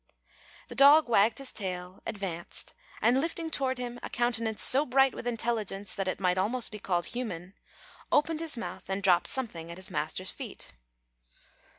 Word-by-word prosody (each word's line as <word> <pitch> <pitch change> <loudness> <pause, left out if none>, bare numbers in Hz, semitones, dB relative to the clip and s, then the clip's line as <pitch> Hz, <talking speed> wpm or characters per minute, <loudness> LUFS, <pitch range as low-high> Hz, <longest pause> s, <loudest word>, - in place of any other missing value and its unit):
The - - -8
dog 285 +2 +7
wagged 220 0 +3
his 275 -1 0
tail, 180 -2 -6
advanced, 185 -5 -4 0.3
and, 250 +4 +4
lifting 330 0 -3
toward 260 -3 -1
him 245 -1 -6
a - - -6
countenance 230 -2 0
so 275 +3 +8
bright 270 -1 +3
with - - -7
intelligence 220 -4 -2
that 195 -2 -3
it 185 - -2
might 180 -1 +1
almost 230 +6 0
be 210 - -7
called 175 -3 -1
human, 195 -7 -6 0.6
opened 310 +1 +2
his 320 -5 -1
mouth, 230 - -7
and 195 +1 -2
dropped 180 -2 +4
something 175 -11 -3
at 170 - -8
his 185 - -7
master's 160 +5 0
feet. - - -8
225 Hz, 170 wpm, -29 LUFS, 185-255 Hz, 0.6 s, so